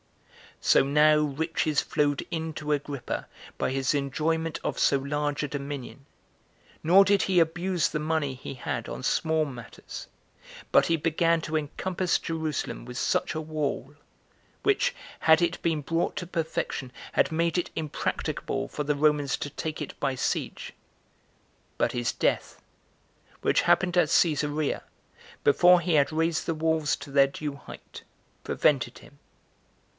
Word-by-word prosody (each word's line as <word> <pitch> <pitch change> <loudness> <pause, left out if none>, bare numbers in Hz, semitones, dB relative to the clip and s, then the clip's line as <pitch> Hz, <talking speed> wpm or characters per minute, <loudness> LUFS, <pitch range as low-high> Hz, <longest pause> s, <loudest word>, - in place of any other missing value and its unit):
6. - - -8
So - - +6
now 150 +2 +5
riches 150 +1 0
flowed 145 -2 0
in 160 -1 -3
to 150 0 -4
Agrippa 145 -3 -3 0.3
by - - +1
his 135 +1 +1
enjoyment 155 +3 -1
of - - -2
so 140 - +4
large 145 +2 -2
a - - -1
dominion; 140 -1 -6 0.8
nor 185 +5 +7
did 200 0 +3
he 185 -2 +3
abuse 175 +2 +1
the 150 - -2
money 155 -3 0
he 130 +1 -8
had 120 -2 -4
on - - -6
small 160 +3 +1
matters, 125 -5 -9 0.6
but - - +5
he 165 - +2
began 165 +1 +2
to 160 0 -4
encompass 175 +4 -1
Jerusalem 160 -6 -3
with 125 0 -8
such 155 - 0
a 155 - -2
wall, 150 -3 -3 0.7
which, 410 -1 +2 0.3
had 160 0 +6
it 170 0 0
been 160 -3 0
brought 165 +4 -1
to 180 - -4
perfection, 160 -6 -3 0.2
had - - +2
made 165 +1 +1
it 175 - -4
impracticable 155 -3 -2
for 150 - -4
the 145 0 0
Romans 145 -2 +2
to 145 - -5
take 155 +2 -4
it 140 - -9
by 135 - 0
siege; - - -3 1.0
but - - +1
his 120 -1 -1
death, - - -1 0.8
which - - +3
happened 180 -1 +2
at 170 -4 +4
Cesarea, 150 -3 +1 0.6
before 175 +5 +6
he 170 0 -1
had 145 -2 +4
raised 160 0 0
the 165 - 0
walls 160 -1 +1
to 145 - -10
their 140 0 +5
due 145 +1 -5
height, 140 - -12 0.4
prevented 130 -5 +1
him. 140 - -17
155 Hz, 150 wpm, -27 LUFS, 140-165 Hz, 1.0 s, nor